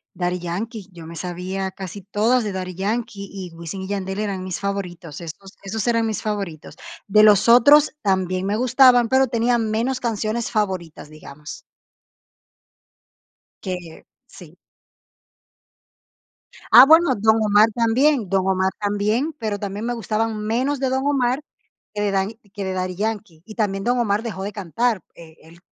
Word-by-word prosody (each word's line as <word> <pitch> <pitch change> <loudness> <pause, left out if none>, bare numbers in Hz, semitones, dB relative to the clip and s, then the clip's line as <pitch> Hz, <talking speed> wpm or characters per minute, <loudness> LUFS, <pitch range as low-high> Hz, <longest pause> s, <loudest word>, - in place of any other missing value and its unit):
Daddy 180 0 -1
Yankee, 195 +4 -5
yo 165 -2 -11
me 165 0 -9
sabía 185 +2 -4
casi 190 +1 -8
todas 220 +5 +1
de 205 - -3
Daddy 185 -1 -5
Yankee 200 0 -3
y 190 -3 -7
Wisin 170 +3 -7
y 190 - -6
Yandel 195 -1 -3
eran 200 -3 -3
mis 185 -2 -5
favoritos. 180 -5 -5
Esos 190 +4 -10
esos 200 +1 -4
eran 230 -1 +2
mis 220 - -2
favoritos. 200 -8 -5 0.3
De 210 +1 +5
los 210 +1 +5
otros 285 +6 +6
también 185 -2 0
me 205 +2 0
gustaban 250 -1 +5
pero 265 +1 +3
tenía 235 +1 +1
menos 230 +3 -1
canciones 225 0 -2
favoritas, 185 -9 -3
digamos. 150 0 -11 2.0
Que 180 -4 -6 0.2
sí. - - -15 2.1
Ah, 245 - +10
bueno, 320 -3 +6
Don 220 +2 +3
Omar 210 +1 +4
también 240 +1 +2
Don 190 0 +1
Omar 190 0 +1
también, 210 +8 0
pero 215 -3 -3
también 205 +3 -5
me 240 - -1
gustaban 225 0 -2
menos 255 +6 0
de 265 - +1
Don 265 +1 -1
Omar 265 -1 +1 0.5
que 205 - -3
de 205 -1 0
Daddy 195 +3 -1 0.2
que 200 - -5
de 190 - -3
Daddy 185 0 -3
Yankee. 205 -5 -4
Y 215 - -11
también 195 -3 -1
Don 245 +1 +1
Omar 215 -2 0
dejó 195 -5 -5
de 200 - -4
cantar, 215 +2 -1
eh, 160 -2 -14
él 165 +2 -17
205 Hz, 160 wpm, -21 LUFS, 185-230 Hz, 2.1 s, Ah